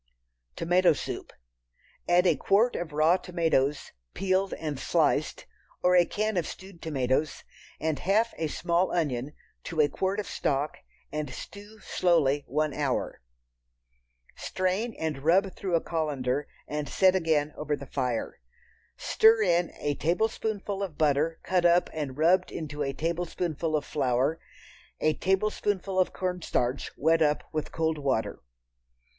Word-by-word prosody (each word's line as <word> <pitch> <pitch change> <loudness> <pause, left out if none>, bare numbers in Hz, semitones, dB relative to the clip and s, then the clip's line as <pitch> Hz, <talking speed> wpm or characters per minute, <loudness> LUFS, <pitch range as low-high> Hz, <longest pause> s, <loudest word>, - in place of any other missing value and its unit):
Tomato 175 +1 +3
Soup. - - -6 0.8
Add 175 +1 +5
a 170 -4 +4
quart 205 - +2
of 175 -2 -4
raw 155 +4 +4
tomatoes, 165 -6 0 0.2
peeled 190 0 +1
and 150 -4 -4
sliced, - - +1 0.4
or 180 0 +4
a 175 -1 +6
can 215 -1 -1
of 170 - 0
stewed 190 -2 -10
tomatoes, 140 -1 -1 0.4
and 155 -3 -1
half 215 +7 +2
a 160 - 0
small 175 +4 0
onion 145 -4 -1 0.3
to 165 - -4
a 150 - +6
quart 190 +6 -2
of 210 - -2
stock, 145 -2 -1 0.3
and 150 -2 -3
stew 205 +11 -10
slowly 145 -5 +2
one 150 +2 0
hour. 140 - -2 1.1
Strain 190 +5 -2
and 155 -3 -2
rub 180 +6 +3
through 185 -3 -2
a 165 - +2
colander 145 -4 -1 0.2
and 150 -1 -3
set 190 +3 +4
again 155 -4 +1
over 150 0 -2
the 140 - -9
fire. 125 -4 -3 0.6
Stir 220 0 +4
in 175 -2 +2
a 145 - 0
tablespoonful 205 +4 -1
of 185 -6 -4
butter 155 +2 +1
cut 180 -2 +1
up 175 +1 +4
and 145 -4 -4
rubbed 180 +4 +3
into 150 -2 -5
a 135 -1 0
tablespoonful 165 0 -2
of 150 - -1
flour. 135 +2 0 0.6
A 155 0 +2
tablespoonful 190 +1 0
of 185 - +2
cornstarch 180 -8 -2
wet 160 +2 +3
up 150 -1 +2
with 155 -1 -3
cold 160 -1 -1
water. 135 -6 -1
165 Hz, 140 wpm, -28 LUFS, 145-185 Hz, 1.1 s, a